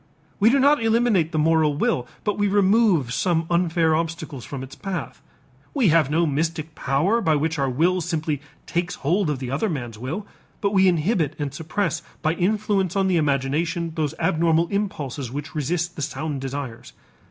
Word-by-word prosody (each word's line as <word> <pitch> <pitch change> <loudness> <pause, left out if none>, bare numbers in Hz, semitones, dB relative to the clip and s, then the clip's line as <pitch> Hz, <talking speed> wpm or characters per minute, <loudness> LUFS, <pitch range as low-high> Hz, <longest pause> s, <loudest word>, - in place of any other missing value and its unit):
We 215 +2 +6
do 270 - +4
not 285 +1 +4
eliminate 225 -7 +2
the 155 - -2
moral 155 -1 +3
will 125 -4 0 0.2
but 205 - 0
we 205 0 +1
remove 195 - +3
some 165 +1 +1
unfair 165 -2 +2
obstacles 160 -5 -3
from 135 -2 -6
its 135 - -10
path. 190 -4 -5 0.5
We 250 -9 +4
have 160 -3 +4
no 165 +3 +2
mystic 160 +1 -2
power 165 - +1
by 160 -6 +2
which 155 +1 -1
our 135 -1 +1
will 175 +8 +2
simply 155 -3 -2 0.2
takes 175 +1 -2
hold 175 +4 0
of 150 - -1
the 130 -1 -5
other 155 +11 0
man's 120 -9 -5
will, 160 - -4 0.3
but 200 - 0
we 190 -1 +5
inhibit 170 - +1
and 145 -2 -3
suppress 160 +7 -2 0.2
by 155 0 +2
influence 195 0 0
on 195 -1 +2
the 180 - +3
imagination 155 +3 0
those 155 -3 -2
abnormal 165 +1 +2
impulses 145 - -3
which 145 +2 -6
resist 170 +4 -1
the - - -6
sound 145 0 -3
desires. 135 -3 -6
160 Hz, 175 wpm, -23 LUFS, 145-185 Hz, 0.5 s, We